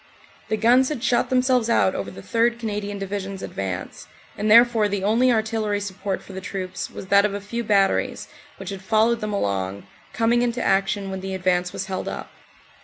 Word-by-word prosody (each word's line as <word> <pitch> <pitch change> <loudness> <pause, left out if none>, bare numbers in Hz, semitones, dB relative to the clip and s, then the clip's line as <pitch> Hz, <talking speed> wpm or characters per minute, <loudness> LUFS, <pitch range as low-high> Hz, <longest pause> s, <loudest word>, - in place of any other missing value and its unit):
The 220 - 0
guns 245 +4 +4
had 280 -6 -4
shot 240 -2 +2
themselves 255 -2 +2
out 190 -4 +3
over 100 - -4
the 95 0 -11
3rd. 235 +1 +1
Canadian 205 -3 -4
Divi 195 +1 -3
sion 195 0 -6
s 190 - -9
advance, 95 -2 -5 0.3
and 210 +1 -1
therefore 230 -1 +6
the 200 -1 -2
only 235 +5 +3
artillery 220 -2 0
support 200 -1 -4
for 195 - -12
the 190 - -6
troops 185 0 -5
was - - -8
that 200 0 +6
of 205 -1 0
a - - -3
few 235 +4 -4
batteries 205 +4 +1 0.3
which 195 0 -7
had 195 -1 -6
followed 225 +3 +2
them 215 0 -3
along, 100 - -2 0.3
coming 235 +1 +2
into 245 0 0
action 195 0 0
when 190 0 -5
the 190 0 -4
advance 180 -1 0
was 195 - -4
held 190 -1 -4
up. - - -6
205 Hz, 200 wpm, -23 LUFS, 190-230 Hz, 0.3 s, therefore